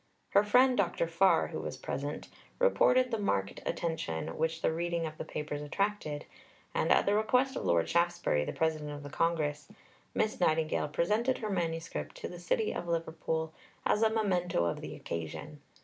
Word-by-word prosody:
Her 200 - +5
friend, 250 +5 +5
Dr. 175 -4 +1
Farr, 170 +4 +3
who - - -4
was - - -5
present, - - -4 0.3
reported 255 - +4
the 225 - 0
marked 100 - -1
attention 160 - -2
which 160 +1 -1
the - - +2
reading 170 0 -1
of 155 -1 -7
the - - -2
Papers 150 -1 -4
attracted, 155 -1 -2 0.5
and - - +1
at - - +5
the 200 - +3
request 250 +5 +2
of - - -3
Lord 85 -1 +3
Shaftesbury, 170 - +2
the - - -3
President 155 -2 -1
of 145 0 -6
the 145 - -8
Congress, 150 -3 0 0.5
Miss 215 0 0
Nightingale 160 -3 +2
presented 210 - +1
her 215 -2 -3
manuscript 165 -2 -3
to - - -5
the 175 - -8
city 210 +5 0
of 175 - -4
Liverpool 160 -1 -2 0.3
as 210 - +2
a 225 - +5
memento 180 - +1
of 85 - -2
the - - -6
occasion. 140 - -6
170 Hz, 175 wpm, -31 LUFS, 155-205 Hz, 0.5 s, Her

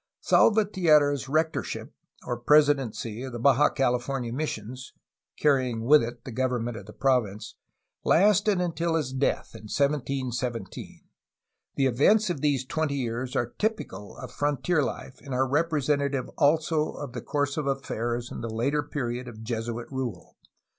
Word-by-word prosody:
Salvatierra's 155 - +3
rectorship, 160 +3 -1 0.3
or 120 - -2
presidency, 120 -5 +2
of 130 0 -5
the - - -4
Baja 140 +4 +4
Cali 125 -3 +1
fornia 125 -2 -4
missions 130 -3 -5 0.4
(carrying 130 -6 +1
with 150 +4 +7
it 120 0 -6
the 130 - -6
government 120 -1 -1
of 105 -3 -9
the - - -9
province) 115 -6 0 0.5
lasted 205 +1 +4
until 170 -1 0
his 150 -5 -1
death, 135 +1 0
in 110 -1 -11
1717. 130 -6 -2 0.7
The 135 - +2
events 180 - +3
of 145 - -4
these 140 -4 +1
twenty 150 +1 -1
years 125 -1 -3
are 120 0 -1
typical 215 - -3
of 130 -1 -8
frontier 145 +3 0
life 135 -1 -5
and 135 -3 -5
are 130 +1 +2
representa 145 -1 +1
tive 130 -3 -3
also 155 +1 +1
of 140 -4 -7
the 120 - -5
course 145 +1 -1
of 150 -3 -2
affairs 120 -3 -2
in - - -6
the 115 - -4
later 130 +7 0
period 125 -4 -4
of 110 -2 -9
Jesuit 115 +1 -3
rule. 125 -9 -5
135 Hz, 150 wpm, -27 LUFS, 120-150 Hz, 0.7 s, with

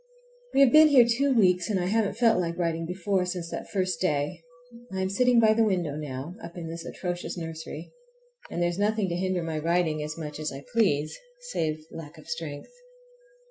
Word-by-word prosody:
We 275 - +6
have 270 -3 +7
been 310 0 +8
here 265 -5 +7
two 270 +4 +2
weeks, 180 -6 +3
and 200 -3 +1
I 175 - -1
haven't 210 +1 0
felt 230 -5 +4
like 170 -1 -3
writing 165 -2 -1
before, 185 +1 0
since 180 -2 -4
that - - -6
first 185 -4 -1
day. 150 -1 0 0.5
I 190 - -3
am 190 0 -1
sitting 250 +3 +4
by 220 -1 +5
the 225 +1 +3
window 180 -8 0
now, 145 +1 -5
up 170 - -9
in 165 -2 -5
this 165 0 -6
atrocious 175 +1 -5
nursery, 160 -1 -7 0.6
and 175 - -1
there 175 - +2
is 175 +2 -4
nothing 210 -1 +1
to 170 - -2
hinder 185 -1 -1
my 160 -1 -3
writing 165 -1 +1
as 150 +1 -5
much 150 -2 -6
as 155 - -2
I 135 +1 -9
please, 155 -10 +2 0.4
save 155 - -2
lack 160 0 -9
of 155 - -14
strength. 160 - -6
175 Hz, 205 wpm, -27 LUFS, 160-205 Hz, 0.6 s, been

